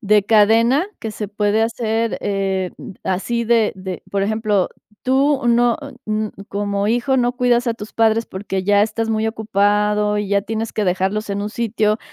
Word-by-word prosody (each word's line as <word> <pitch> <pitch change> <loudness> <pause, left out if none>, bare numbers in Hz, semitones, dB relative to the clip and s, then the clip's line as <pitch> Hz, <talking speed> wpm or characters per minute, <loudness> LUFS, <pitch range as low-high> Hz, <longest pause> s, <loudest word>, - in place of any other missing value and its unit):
de 210 -2 +3
cadena 230 - +4
que 225 -5 -4
se 210 -1 -5
puede 210 +1 +1
hacer, 225 0 -1
eh, 195 -2 -1
mm, - - -9
así 235 +6 -1
de 225 -2 +3
de, 185 -1 -6
por 195 -1 0
ejemplo, 210 -2 +1 0.3
tú 270 +2 +2
no, 240 0 +3 0.3
mm, 215 0 -1 0.2
como 200 0 -1
hijo 245 +4 +1
no 245 -1 +2
cuidas 245 0 +2
a 235 - +2
tus 210 -1 -9
padres 225 0 +2
porque 190 0 -4
ya 205 +1 +4
estás 225 +1 -1
muy 220 0 0
ocupado 210 -1 +1
y 205 -1 -2
ya 200 0 +2
tienes 225 +2 -3
que 215 - 0
dejarlos 190 +4 -1
en 200 0 -2
un 210 - -2
sitio 220 -1 0
215 Hz, 180 wpm, -19 LUFS, 205-230 Hz, 0.3 s, cadena